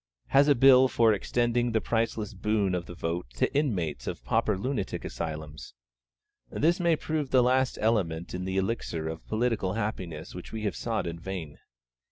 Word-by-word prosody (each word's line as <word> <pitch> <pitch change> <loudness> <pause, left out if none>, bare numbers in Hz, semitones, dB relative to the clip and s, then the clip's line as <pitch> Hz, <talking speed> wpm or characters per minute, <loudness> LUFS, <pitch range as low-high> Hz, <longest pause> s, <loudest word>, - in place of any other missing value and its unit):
has 140 +1 +5
a 145 - +5
Bill 130 +1 +7
for 115 -3 +4
extending 120 +3 0
the 110 - +3
priceless 110 0 -1
boon 100 -1 0
of 85 -1 -2
the 90 - -8
vote 85 -2 -3
to - - 0
inmates 90 - -1
of - - -5
Pauper 110 +1 +1
Lunatic 130 +6 -3
Asylums? 75 -2 -6 0.7
This 170 +5 +1
may 170 -2 +3
prove 155 -2 -2
that 130 -1 +5
last 130 +1 +2
element 90 -7 0
in 90 0 -3
the 95 0 -2
Elixir 95 -5 -2
of 80 0 -6
political 110 -4 0
happiness 95 -8 -4
which 90 - -9
we 110 -1 -5
have 100 -4 -1
sought 115 -4 -2
in 85 -1 -5
vain. 85 -5 -6
105 Hz, 175 wpm, -28 LUFS, 85-120 Hz, 0.7 s, Bill